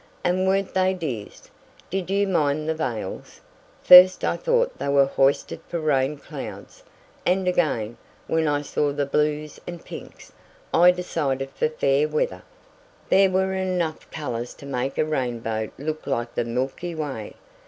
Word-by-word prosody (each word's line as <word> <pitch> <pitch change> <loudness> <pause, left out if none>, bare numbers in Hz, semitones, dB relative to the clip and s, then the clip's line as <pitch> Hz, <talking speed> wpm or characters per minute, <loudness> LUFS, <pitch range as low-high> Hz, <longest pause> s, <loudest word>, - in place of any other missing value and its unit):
And 185 +1 +1
weren't 195 0 +1
they 190 0 +2
dears? 130 - -6 0.4
Did 185 -1 -2
you 200 +1 +2
mind 155 -4 +1
the 160 - +1
veils? 120 -11 -5 0.4
First 180 +1 +9
I - - +1
thought - - 0
they - - -3
were 140 -1 +4
hoisted 135 0 +1
for 170 - -3
rain 145 -2 +1
clouds, - - -9 0.4
and 185 +1 +1
again, 120 -11 0 0.3
when 160 -1 +1
I 145 0 0
saw 145 0 0
the 145 0 -1
blues 150 +1 -1
and 175 -1 -8
pinks, - - -10 0.4
I 175 +2 +7
decided 145 -7 -1
for - - 0
fair 145 -1 +1
weather. 125 -12 -1 0.7
There 195 0 +5
were 190 +1 +1
enough 180 -4 -2
colors 120 -6 -5
to - - -12
make 135 0 -3
a - - +2
rainbow 120 -7 -2
look 155 +3 -5
like 120 -3 -2
the 120 - -1
milky 130 +8 -3
way. 140 -9 -5
150 Hz, 155 wpm, -24 LUFS, 135-180 Hz, 0.7 s, First